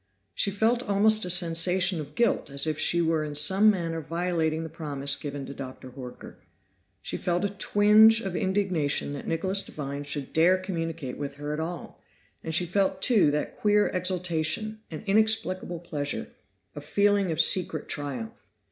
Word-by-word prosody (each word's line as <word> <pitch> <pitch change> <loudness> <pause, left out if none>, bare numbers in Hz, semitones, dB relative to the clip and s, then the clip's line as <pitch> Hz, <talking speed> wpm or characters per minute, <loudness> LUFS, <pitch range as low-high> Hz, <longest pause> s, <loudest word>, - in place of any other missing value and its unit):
She 200 - +1
felt 220 +5 +1
almost 215 -1 +3
a - - -4
sensation 180 +1 +2
of 145 - -11
guilt 235 -2 +1
as 140 +1 0
if 155 -1 -2
she 170 0 +2
were 160 -1 +1
in 150 -1 -5
some 190 +8 +5
manner 165 -5 -1
violating 165 0 -1
the - - -5
promise 145 -4 -1
given 140 -2 -6
to 140 - -8
Dr. 130 -1 -9
Horker; 125 -1 -10 0.7
she - - -4
felt 180 +1 -1
a - - 0
tinge 210 +2 +5
of 195 -5 -5
indignation 185 -8 0
that 140 - -7
Nicholas 190 +4 -1
Devine 140 -1 -6
should 145 -1 -5
dare 175 +4 +4
communicate 165 -7 -5
with 140 -1 -5
her 145 +1 -5
at 150 - -4
all, 170 +2 -6 0.4
and 160 -1 -1
she 175 - +3
felt 190 +1 0
too 215 - +4
that 150 +1 -3
queer 210 0 +2
exultation, 185 +4 -1
an 160 - -8
inexplicable 195 -4 0
pleasure, 145 -4 -4 0.4
a 145 - -7
feeling 200 +2 +1
of 155 - -3
secret 165 -4 +2
triumph. 125 -8 -5
170 Hz, 165 wpm, -26 LUFS, 150-195 Hz, 0.7 s, some